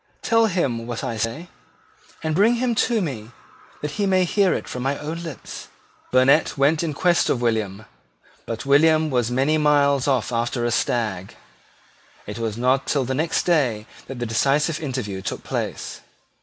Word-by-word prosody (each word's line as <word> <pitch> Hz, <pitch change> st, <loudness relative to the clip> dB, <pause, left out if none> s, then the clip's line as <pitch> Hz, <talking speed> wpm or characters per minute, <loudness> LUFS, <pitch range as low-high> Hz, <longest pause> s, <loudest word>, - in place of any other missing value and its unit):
Tell 230 Hz, -1 st, +3 dB
him 130 Hz, -, -1 dB
what 120 Hz, -2 st, -4 dB
I 115 Hz, -, -3 dB
say; 115 Hz, +10 st, -3 dB, 0.8 s
and 160 Hz, -1 st, -1 dB
bring 210 Hz, +8 st, +4 dB
him 240 Hz, 0 st, 0 dB
to 230 Hz, -2 st, +1 dB
me 115 Hz, -9 st, -5 dB, 0.5 s
that 150 Hz, -, -2 dB
he 200 Hz, -, +2 dB
may 185 Hz, -1 st, +3 dB
hear 190 Hz, +2 st, +2 dB
it -, -, -2 dB
from 125 Hz, -, -5 dB
my 135 Hz, +2 st, -1 dB
own 160 Hz, +3 st, -5 dB
lips." 165 Hz, -5 st, -8 dB, 0.4 s
Burnet 130 Hz, +5 st, +3 dB
went 145 Hz, +3 st, +3 dB
in 165 Hz, -2 st, -1 dB
quest 175 Hz, +3 st, +2 dB
of 125 Hz, -, +1 dB
William; 110 Hz, -3 st, -1 dB, 0.6 s
but 115 Hz, +3 st, -5 dB
William 155 Hz, +2 st, +4 dB
was 125 Hz, -3 st, +1 dB
many 135 Hz, +5 st, +1 dB
miles 140 Hz, -2 st, +3 dB
off 130 Hz, -5 st, +1 dB
after 120 Hz, +1 st, -1 dB
a 120 Hz, -, 0 dB
stag. 105 Hz, -6 st, -1 dB, 0.9 s
It 105 Hz, +3 st, -7 dB
was 110 Hz, -2 st, -3 dB
not 130 Hz, +3 st, +1 dB
till 140 Hz, -3 st, +1 dB
the 130 Hz, -, -2 dB
next 160 Hz, +5 st, 0 dB
day 130 Hz, -11 st, +1 dB, 0.2 s
that 135 Hz, -, -7 dB
the 120 Hz, -, -3 dB
decisive 145 Hz, +7 st, +1 dB
interview 125 Hz, -, -4 dB
took 95 Hz, -, -5 dB
place. -, -, -4 dB
135 Hz, 170 wpm, -22 LUFS, 120-160 Hz, 0.9 s, bring